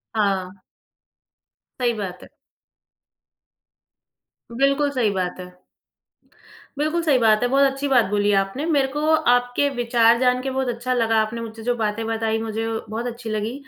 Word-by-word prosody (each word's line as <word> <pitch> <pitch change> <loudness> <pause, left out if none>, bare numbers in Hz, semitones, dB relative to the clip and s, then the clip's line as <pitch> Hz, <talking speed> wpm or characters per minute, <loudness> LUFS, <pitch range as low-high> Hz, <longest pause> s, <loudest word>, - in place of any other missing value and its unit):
हाँ। 195 -3 0 1.2
सही 240 -2 +1
बात 185 -3 -6
है। - - -13 2.2
बिल्कुल 275 +4 +1
सही 235 -4 +2
बात 185 -1 -3
है। 180 - -6 1.3
बिल्कुल 310 +4 0
सही 295 -5 +3
बात 220 -3 +3
है, - - +3
बहुत 275 +1 +3
अच्छी 275 +1 -4
बात 245 -4 +4
बोली 205 +1 +1
आपने, 195 +10 -3
मेरे 285 -5 +2
को 295 - -2 0.3
आपके 245 +3 +1
विचार 235 -1 +3
जान 250 0 +2
के 270 - -3
बहुत 265 0 -2
अच्छा 240 +2 -2
लगा 225 -2 +1
आपने 220 +2 -4
मुझसे 225 -1 -8
जो 245 +1 0
बातें 215 +1 -1
बताई 225 0 -1
मुझे 225 0 -3 0.2
बहुत 225 +3 -4
अच्छी 235 -1 -7
लगी। 215 +2 -2
235 Hz, 155 wpm, -22 LUFS, 215-255 Hz, 2.2 s, बात